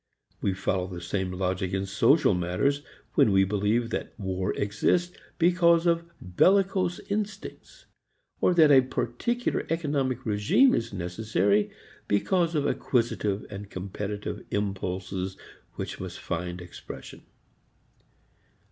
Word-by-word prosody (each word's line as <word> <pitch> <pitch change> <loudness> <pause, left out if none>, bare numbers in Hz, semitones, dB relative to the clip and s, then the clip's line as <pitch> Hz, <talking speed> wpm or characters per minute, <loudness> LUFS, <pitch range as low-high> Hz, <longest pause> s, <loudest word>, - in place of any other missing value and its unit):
We 95 - 0
follow 95 -1 -1
the 90 -2 -7
same 90 +1 -2
logic 95 0 -2
in 95 0 0
social 115 - +4
matters 90 +12 0 0.3
when 105 - +4
we 95 0 +5
believe 105 +4 0
that - - -4
war 95 -2 -1
exists 170 - 0 0.2
because 170 -1 +4
of 170 0 +1
bellicose 185 - +2
instincts; 215 - -5 0.5
or 180 - +3
that 155 -3 +6
a 135 -2 +8
particular 130 - -1
economic 140 -6 -1
regime 110 - +4
is 115 0 -1
necessary 100 +2 0 0.4
because 170 - +1
of 145 - +1
acquisitive 105 -5 0
and 100 0 -7
competitive 100 +2 -5
impulses 95 -1 -3 0.4
which - - -5
must 95 -1 -6
find 90 +1 -4
expression. 90 0 -10
105 Hz, 115 wpm, -27 LUFS, -, 0.5 s, a